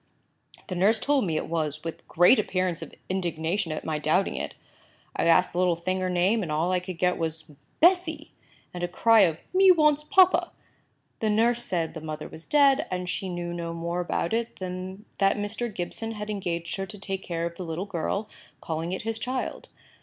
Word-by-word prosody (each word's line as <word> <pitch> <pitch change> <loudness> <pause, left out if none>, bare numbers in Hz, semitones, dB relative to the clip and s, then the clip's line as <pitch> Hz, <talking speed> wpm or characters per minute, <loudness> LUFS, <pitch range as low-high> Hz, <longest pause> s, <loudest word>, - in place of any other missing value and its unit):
"The - - -5
nurse 200 +5 +3
told 280 -7 +1
me 160 -2 0
it - - -2
was, 155 -2 -2
with 165 -1 -7
great 175 +9 +5
appearance 185 -4 -1
of - - -9
indignation 170 -1 -1
at 155 - -4
my 155 -1 -1
doubting 160 +6 +1
it. - - -4 0.6
I - - 0
asked 170 +2 +4
the 175 - -1
little 180 -2 +3
thing 185 +3 -2
her 185 0 -1
name, 185 +5 +2
and 165 -6 -3
all 160 +4 +1
I 185 - +2
could 180 -1 -7
get 180 +1 +1
was 160 -1 -4 0.3
'Bessy!' 335 -3 +3 0.4
and 175 - -6
a - - +1
cry 225 +5 +4
of 170 -6 +4 0.2
'Me 380 +1 +6
wants 300 -4 +5
papa!' 370 +4 +4 0.7
The 220 - 0
nurse 230 +3 +3
said 170 -7 -2
the 160 - -7
mother 155 -1 -5
was 160 - -11
dead, 285 -1 +4
and 180 -1 -3
she 190 +1 -3
knew 175 -1 -4
no 170 -1 -4
more 170 +1 -3
about 175 +1 -1
it 230 0 -1
than 185 +2 -6
that 195 0 +3
Mr. 220 +3 -3
Gibson 215 +4 -4
had 210 0 -5
engaged 170 -4 -3
her 195 0 -3
to 210 - -9
take 195 -1 -4
care 170 -2 -3
of 170 0 -5
the 185 - -5
little 170 +3 -4
girl, 200 +2 -2 0.3
calling 165 +2 -3
it 190 - -4
his 225 0 -3
child. 255 +2 -4
185 Hz, 205 wpm, -26 LUFS, 170-220 Hz, 0.7 s, Me